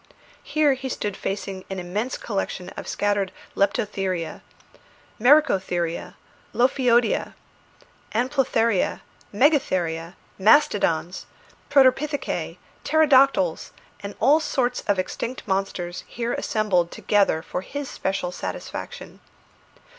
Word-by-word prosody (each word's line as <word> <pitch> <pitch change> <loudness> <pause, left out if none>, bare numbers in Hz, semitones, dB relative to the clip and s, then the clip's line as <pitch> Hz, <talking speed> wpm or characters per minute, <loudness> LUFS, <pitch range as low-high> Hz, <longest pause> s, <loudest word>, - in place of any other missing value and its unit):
Here 305 -2 +2
he 265 0 -5
stood 205 -5 -3
facing 195 -1 -4
an 190 - -4
immense 200 +8 -3
collection 195 -4 -4
of - - -9
scattered 205 -2 0 0.2
leptotheria, 195 -3 -1 0.8
mericotheria, 190 - +2 0.4
lophiodia, 245 -2 +2 0.8
anoplotheria, 235 -5 +1 0.3
megatheria, 185 - +1 0.2
mastodons, 190 - +3 0.4
protopithecæ, 280 +2 +2 0.3
pterodactyles, 275 - +3 0.3
and 200 0 -7
all 280 +7 +5
sorts 250 -5 -1
of 205 - +2
extinct 235 +8 -4
monsters 190 -2 -2
here 235 0 -3
assembled 195 -6 0
together 195 -6 +1
for 180 - -4
his 285 +7 -6
special 190 -5 -3
satisfaction. - - -7
205 Hz, 90 wpm, -24 LUFS, 185-260 Hz, 0.8 s, all